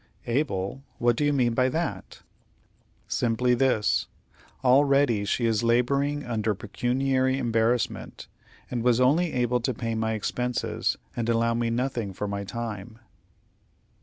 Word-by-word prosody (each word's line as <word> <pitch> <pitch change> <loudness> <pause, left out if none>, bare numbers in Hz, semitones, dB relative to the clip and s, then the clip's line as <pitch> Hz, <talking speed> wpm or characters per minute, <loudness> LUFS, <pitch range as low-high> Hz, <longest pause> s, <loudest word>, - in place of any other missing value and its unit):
"Able! 120 -3 -1 0.2
What 120 -2 +2
do 150 - -1
you 145 - +3
mean 125 -4 +2
by 130 +2 +2
that?" 165 +3 -4 0.8
"Simply 120 +1 +1
this: 110 - +2 0.6
Already 135 -4 +4
she 115 +4 0
is 115 -1 +2
laboring 140 +5 +1
under 110 -3 -1
pecuniary 130 +5 0
embarrassment, 115 -1 -1 0.4
and 120 - -1
was 120 0 +3
only 155 +7 +3
able 125 0 +1
to 120 +1 -2
pay 115 0 -3
my 110 0 -1
expenses, 125 +3 -1 0.2
and 120 -1 -2
allow 115 0 +2
me 115 0 0
nothing 115 -4 -2
for 105 +3 -4
my 100 0 -3
time." 110 0 -6
120 Hz, 135 wpm, -26 LUFS, 110-130 Hz, 0.8 s, Already